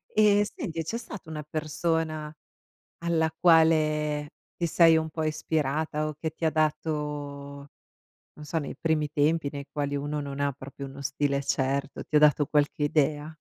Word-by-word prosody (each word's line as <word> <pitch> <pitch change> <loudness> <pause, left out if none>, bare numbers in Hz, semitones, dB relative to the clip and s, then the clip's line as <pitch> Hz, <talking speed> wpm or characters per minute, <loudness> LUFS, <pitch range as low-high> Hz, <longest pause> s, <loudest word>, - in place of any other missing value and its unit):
Ehm, 205 -1 +5
senti, 195 - -4
c'è 225 +9 -3
stata 210 -8 -9
una 150 -1 -5
persona 155 0 -2 0.7
alla 160 -1 +2
quale 155 -3 +3 0.3
ti 170 - 0
sei 165 0 +6
un 160 0 -1
po' 160 0 -3
ispirata 155 0 -1
o 155 - -5
che 160 0 -2
ti 165 - -12
ha 160 - +4
dato, 155 0 0 1.4
non 150 - -11
so, 165 - -2
nei 150 - -3
primi 155 -2 0
tempi 155 +1 +1
nei 140 -1 -7
quali 145 -1 -2
uno 145 +1 -2
non 140 -1 -5 0.2
proprio 135 +1 -8
uno 135 +1 -10
stile 140 0 0
certo, 140 +1 -1
ti 155 - -4
ha - - +6
dato 150 -1 +5
qualche 150 0 +1
idea? 150 0 +1
155 Hz, 160 wpm, -27 LUFS, 145-160 Hz, 1.4 s, sei